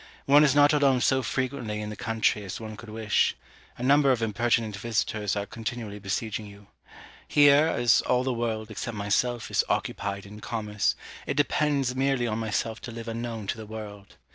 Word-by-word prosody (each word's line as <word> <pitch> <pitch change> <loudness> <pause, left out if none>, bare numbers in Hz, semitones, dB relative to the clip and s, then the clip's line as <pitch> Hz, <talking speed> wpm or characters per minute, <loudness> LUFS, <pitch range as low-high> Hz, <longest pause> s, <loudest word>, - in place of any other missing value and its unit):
One 145 +2 +7
is 145 -2 +3
not 145 +1 +6
alone 140 -3 +4
so 130 +2 +2
frequently 130 -4 -2
in 105 0 -5
the - - -6
country 110 0 0
as 95 - -6
one 110 -1 -7
could 110 +1 -11
wish: 110 -1 +1 0.4
a 120 - -6
number 140 +1 +5
of 120 -3 +1
impertinent 110 0 0
visitors 105 -1 -1
are 100 0 -2
continually 110 -2 -6
besieging 105 +2 -3
you. 100 0 -14 0.6
Here, 145 +1 +6
as 120 -7 +3
all 125 0 +2
the 130 -1 0
world, 110 -2 -3
except 110 +1 -5
myself, 115 +4 0
is - - +3
occupied 100 0 -2
in 105 +1 -11
commerce, 105 -2 -1 0.3
it 140 - -2
depends 145 -3 +1
merely 135 -2 +1
on 110 -1 -2
myself 110 0 -2
to 120 - -7
live 115 0 -8
unknown 115 -1 -4
to 100 - -3
the 110 -1 -8
world. 105 -2 -9
115 Hz, 185 wpm, -27 LUFS, 105-130 Hz, 0.6 s, One